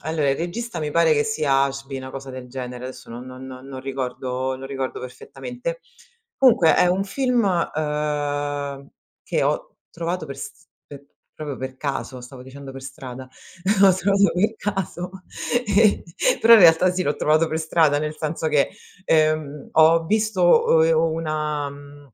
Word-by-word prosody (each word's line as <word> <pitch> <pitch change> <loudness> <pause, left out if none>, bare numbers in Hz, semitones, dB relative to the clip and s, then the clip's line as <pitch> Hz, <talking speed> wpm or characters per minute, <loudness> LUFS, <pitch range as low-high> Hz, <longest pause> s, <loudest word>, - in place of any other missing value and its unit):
allora 155 -3 0
il 135 - 0
regista 175 +3 -4
mi 150 -1 -3
pare 170 -2 +4
che 145 -1 +2
sia 145 -10 +2
Ashby, 135 0 -5
una 130 0 -7
cosa 135 0 -8
del 130 -1 -8
genere, 125 -1 -6
adesso 130 -2 -9
non 120 +2 -8
non 130 +1 -10
non 130 0 -9
ricordo 130 -1 -3
non 135 +1 -8
ricordo 135 -1 -4
perfettamente. 245 - -7 0.6
Comunque 235 -11 +5
è - - +5
un 185 +2 +1
film, 250 +3 0 0.3
uhm, 145 -2 -2 0.4
che - - 0
ho - - -1
trovato 170 0 -3
per 140 -1 -7
st - - -10 0.2
per 140 -1 -12 0.3
proprio 145 -3 -6
per 130 0 -6
caso, 135 -2 -4
stavo 125 +1 -11
dicendo 135 +1 -10
per 135 0 -9
strada, 130 -1 -8 0.6
ho 195 - +8
trovato 200 0 +3
per 210 +5 +1
caso, 190 -4 -3 0.6
e 205 +1 +3 0.4
però 230 - +7
in 220 - +7
realtà 175 +1 +6
sì, 185 0 -1
l'ho 145 - -1
trovato 155 +2 +2
per 160 - -2
strada, 160 -2 +2
nel 155 +1 -3
senso 160 +1 -3
che, 150 -2 +2 0.4
ehm, 155 -3 +1
ho 160 +1 +5
visto 210 -3 +3
uhm, 160 0 +5
e 165 - +3
una 155 -2 -1
mhmm, 145 -1 -14
150 Hz, 165 wpm, -22 LUFS, 135-170 Hz, 0.6 s, ho